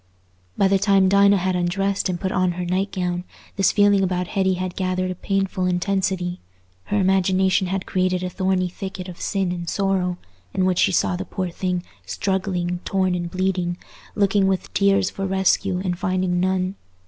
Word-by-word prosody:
By 195 - +4
the 195 0 +3
time 195 -1 +4
Dinah 200 +1 +5
had 185 0 0
undressed 195 +3 0
and 175 -1 -2
put 190 +1 -2
on 185 -2 +1
her 180 +1 -4
night 190 +3 -1
gown, 180 -1 -2 0.3
this 195 -1 +3
feeling 205 -2 +4
about 180 -1 -1
Hetty 190 -2 +1
had 185 -1 -4
gathered 185 0 -1
a - - -2
painful 195 0 -1
intensity; 180 -1 -1 0.5
her 205 - -1
imagination 190 0 +2
had 190 +1 -2
created 185 -1 0
a 180 - -2
thorny 185 0 0
thicket 185 +1 -7
of 180 -2 -9
sin 190 -3 -1
and 170 -1 -4
sorrow, 190 -2 0 0.4
in 185 - +2
which 185 -1 +1
she - - +4
saw 180 - +1
the 180 - -3
poor 185 -2 -4
thing 180 0 -2 0.2
struggling 180 - -2
torn 185 -2 0
and 175 -1 -2
bleeding, 185 -1 -1 0.4
looking 200 -1 +3
with 190 -1 -2
tears 200 -1 +3
for 195 0 -3
rescue 190 0 +1
and 180 -2 -2
finding 185 -1 0
none. 185 +1 0
185 Hz, 180 wpm, -22 LUFS, 180-195 Hz, 0.5 s, Dinah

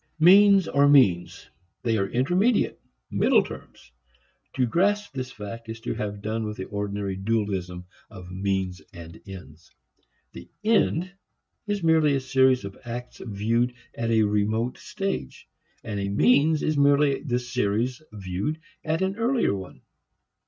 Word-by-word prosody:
Means 195 +2 +6
are 140 +1 +3
means; 105 -12 +3 0.4
they 115 -2 +1
are 100 -2 0
intermediates, 180 - +1 0.3
middle - - +3
terms. 60 - -12 0.6
To 130 - +1
grasp 205 - 0
this 130 -1 -5
fact 110 +3 -9
is 115 0 -6
to - - -3
have 100 -1 -5
done 110 +1 -2
with 105 0 -5
the 95 - -4
ordinary 100 -1 -3
dualism 95 -4 -2 0.2
of 90 -4 -11
means 95 -1 -2
and 85 -1 -11
ends. 85 -5 -12 0.6
The 65 - -11
"end" 185 -5 +2 0.6
is 205 -3 -2
merely 160 -3 +4
a - - +1
series 130 -3 +2
of 100 - -9
acts 120 0 -7
viewed 115 +3 -1 0.2
at 115 0 -3
a 110 -1 +3
remote 105 +3 0
stage; 195 - -5 0.4
and 105 -2 -4
a 100 0 -2
means 140 +9 +3
is 155 -2 0
merely 140 0 +3
the 125 -5 -1
series 120 +1 -1
viewed 100 - -4 0.2
at 160 +3 -1
an 190 +2 -2
earlier 235 - +1
one. 95 -2 -8
115 Hz, 145 wpm, -25 LUFS, 100-150 Hz, 0.6 s, Means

